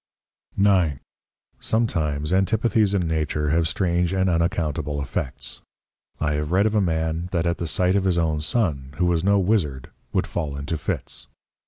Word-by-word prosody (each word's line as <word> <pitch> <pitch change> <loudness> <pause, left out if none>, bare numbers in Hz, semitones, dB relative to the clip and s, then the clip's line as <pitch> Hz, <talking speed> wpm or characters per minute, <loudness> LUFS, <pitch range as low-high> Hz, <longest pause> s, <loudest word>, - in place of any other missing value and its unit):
9. 90 -9 +3 0.6
Sometimes 80 -9 0
Antipathies 100 +2 +2
in 90 -4 +1
Nature 75 -2 0
have 80 0 +2
strange 85 +1 0
and 95 -1 +2
unaccountable 80 -3 0
Effects. 65 -2 -4 0.6
I 75 - 0
have 75 +1 -2
read 95 +3 +3
of 110 - +1
a 105 - +3
Man 80 -1 -1
that 85 -2 0
at 85 0 0
the 85 - -2
sight 90 +4 +2
of 100 -1 +1
his 90 -2 +2
own 80 -2 +1
Son, 75 - -1
who 90 - +2
was 85 -1 +1
no 100 +1 +4
Wizzard 90 - 0 0.2
would - - +1
fall 75 -5 -3
into 70 +3 -3
Fits. 75 - -4
85 Hz, 165 wpm, -23 LUFS, 75-95 Hz, 0.6 s, no